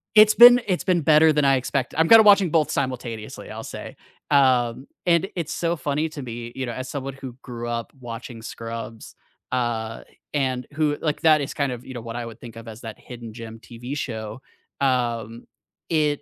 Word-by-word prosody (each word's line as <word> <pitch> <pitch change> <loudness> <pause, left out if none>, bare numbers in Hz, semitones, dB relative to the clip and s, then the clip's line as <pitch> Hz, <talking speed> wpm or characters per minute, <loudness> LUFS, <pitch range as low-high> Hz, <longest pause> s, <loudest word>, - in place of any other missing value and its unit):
It's 215 0 +7
been 245 +1 +9
it's 185 -2 0
been 180 -3 +2
better 155 +1 +5
than 150 -1 +2
I 135 0 +5
expect 130 0 -2
I'm 165 0 +4
kinda 225 -1 +9
watching 200 -4 +6
both 155 -3 +2
simultaneously, 120 -5 -4
I'll - - -7
say. - - -8 0.3
Um, 130 -3 +2 0.2
and 175 +2 +3
it's 165 -3 -3
so 170 0 -1
funny 150 +2 -2
to 150 -2 -8
me, 120 -1 -7
you 130 - -3
know, 120 - -4
as 130 +2 -6
someone 135 -1 -5
who 135 -3 -9
grew 120 -2 -7
up 115 -1 -4
watching 115 -1 -8
Scrubs, 115 0 -8 0.4
uh, 115 -3 -2 0.3
and 130 -3 -1
who 150 -1 0
like, 150 -2 -1
that 155 -2 +5
is 135 - -4
kind 140 -3 -1
of, 125 0 -7
you 130 - -8
know, 120 - -6
what 115 0 -7
I 120 -1 -4
would 115 0 -10
think 115 -2 -11
of 115 0 -11
as 110 +1 -9
that 110 -3 -8
hidden 120 -3 -10
gem 115 -1 -9
TV 120 +3 -8
show, 110 -2 -5 0.4
um, 120 -3 -1 0.4
it 150 -3 +1
130 Hz, 200 wpm, -23 LUFS, 115-150 Hz, 0.4 s, been